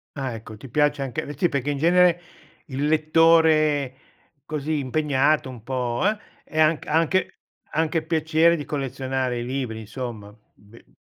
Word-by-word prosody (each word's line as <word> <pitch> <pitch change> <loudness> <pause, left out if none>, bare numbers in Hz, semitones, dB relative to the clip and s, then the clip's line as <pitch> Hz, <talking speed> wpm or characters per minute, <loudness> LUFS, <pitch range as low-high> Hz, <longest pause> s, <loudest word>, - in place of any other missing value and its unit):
Ah, 135 -4 -3
ecco, 110 -1 -9
ti 135 - -11
piace 145 +2 +1
anche 130 -3 -4
sì 175 - +3
perché 140 -2 -2
in 140 - -3
genere 175 +2 +4 0.5
il 140 +1 -3
lettore 155 -3 +3 0.5
così 155 -1 -2
impegnato, 145 +1 +1
un 120 -4 -10
po' 125 -2 -2
uh, 210 +2 +2 0.3
è 155 - -5
anch 155 0 +3
anche 165 +4 +1 0.4
anche 160 +1 0
piacere 160 +1 +2
di 145 - -6
collezionare 130 -3 -2
i 120 - -4
libri 125 -4 -3
insomma, 110 -1 -7
mhmm, 105 +1 -21 0.3
be 115 - -16
uhm - - -30
145 Hz, 155 wpm, -23 LUFS, 130-160 Hz, 0.5 s, genere